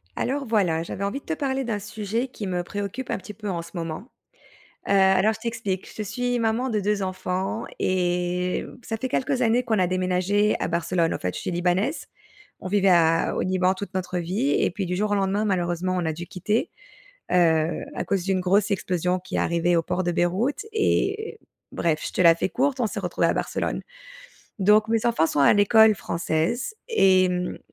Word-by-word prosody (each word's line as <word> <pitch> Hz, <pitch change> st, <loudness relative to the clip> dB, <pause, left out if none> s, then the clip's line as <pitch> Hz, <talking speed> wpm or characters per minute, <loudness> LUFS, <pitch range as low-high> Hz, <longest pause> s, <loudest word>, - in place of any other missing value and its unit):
Alors 275 Hz, +2 st, -2 dB
voilà, 185 Hz, -8 st, +1 dB
j'avais 190 Hz, +3 st, -5 dB
envie 200 Hz, +8 st, -2 dB
de -, -, -29 dB
te 325 Hz, -, -2 dB
parler 270 Hz, -3 st, -1 dB
d'un 225 Hz, -4 st, -2 dB
sujet 215 Hz, +4 st, -3 dB
qui 220 Hz, -5 st, -7 dB
me 180 Hz, -1 st, -1 dB
préoccupe 205 Hz, +7 st, -5 dB
un -, -, 0 dB
petit 210 Hz, +2 st, -9 dB
peu 210 Hz, 0 st, -6 dB
en 175 Hz, -3 st, -2 dB
ce 170 Hz, -, -12 dB
moment. 165 Hz, +7 st, -5 dB, 0.8 s
Heu, -, -, -1 dB
alors, 195 Hz, +2 st, +4 dB
je 220 Hz, -, -10 dB
t'explique, 220 Hz, -5 st, -3 dB
je 215 Hz, -, -2 dB
suis 245 Hz, +4 st, -1 dB
maman 230 Hz, +3 st, 0 dB
de 215 Hz, -3 st, 0 dB
2 205 Hz, 0 st, 0 dB
enfants 185 Hz, +3 st, -3 dB
et 180 Hz, 0 st, 0 dB
mmh, -, -, -11 dB
ça 225 Hz, -, -4 dB
fait 260 Hz, +3 st, -3 dB
quelques 265 Hz, +1 st, 0 dB
années 240 Hz, +1 st, +3 dB
qu'on 220 Hz, -4 st, 0 dB
a 180 Hz, -, +3 dB
déménagé 185 Hz, +3 st, +1 dB
à -, -, -1 dB
Barcelone, 170 Hz, 0 st, 0 dB
en -, -, -2 dB
fait, 90 Hz, 0 st, -2 dB
je -, -, -4 dB
suis -, -, -3 dB
libanaise. 180 Hz, -, 0 dB, 0.5 s
On -, -, -6 dB
vivait 195 Hz, 0 st, +3 dB
a 165 Hz, -2 st, +3 dB
au -, -, -1 dB
Liban 185 Hz, 0 st, +2 dB
toute 200 Hz, +1 st, -7 dB
notre 185 Hz, -1 st, -2 dB
vie 195 Hz, +11 st, -1 dB
et -, -, +2 dB
puis 195 Hz, +2 st, -3 dB
du 180 Hz, 0 st, -2 dB
jour 210 Hz, +3 st, -1 dB
au -, -, +3 dB
lendemain, 200 Hz, +1 st, 0 dB
malheureusement, 185 Hz, -2 st, 0 dB
on 175 Hz, -, -1 dB
a 160 Hz, -, -1 dB
dû 170 Hz, +2 st, -7 dB
quitter, 210 Hz, -, -1 dB, 0.6 s
heu, 165 Hz, -2 st, +2 dB
à -, -, -3 dB
cause 195 Hz, -3 st, 0 dB
d'une 190 Hz, 0 st, 0 dB
grosse 195 Hz, +3 st, +2 dB
explosion 180 Hz, -1 st, 0 dB
qui 185 Hz, +1 st, -7 dB
est -, -, +1 dB
arrivée 170 Hz, +1 st, +1 dB
au 165 Hz, -, +3 dB
port 185 Hz, +2 st, -2 dB
de 175 Hz, -, 0 dB
Beyrouth 195 Hz, -, 0 dB
et 430 Hz, 0 st, 0 dB, 0.3 s
bref, 160 Hz, -2 st, 0 dB
je -, -, -4 dB
te -, -, +1 dB
la 165 Hz, -2 st, +7 dB
fais 170 Hz, -, -1 dB
courte, 270 Hz, +3 st, 0 dB
on 235 Hz, -, +2 dB
s'est -, -, -5 dB
retrouvé -, -, 0 dB
à -, -, +2 dB
Barcelone. -, -, -2 dB, 0.8 s
Donc 210 Hz, +2 st, +4 dB
mes 225 Hz, 0 st, +1 dB
enfants 230 Hz, -9 st, +3 dB
sont 150 Hz, -, -1 dB
à 140 Hz, -, +6 dB
l'école 220 Hz, +1 st, +6 dB
française 170 Hz, -, -2 dB
et 190 Hz, -, +4 dB
mmh, 180 Hz, 0 st, -2 dB
190 Hz, 210 wpm, -24 LUFS, 180-220 Hz, 0.8 s, la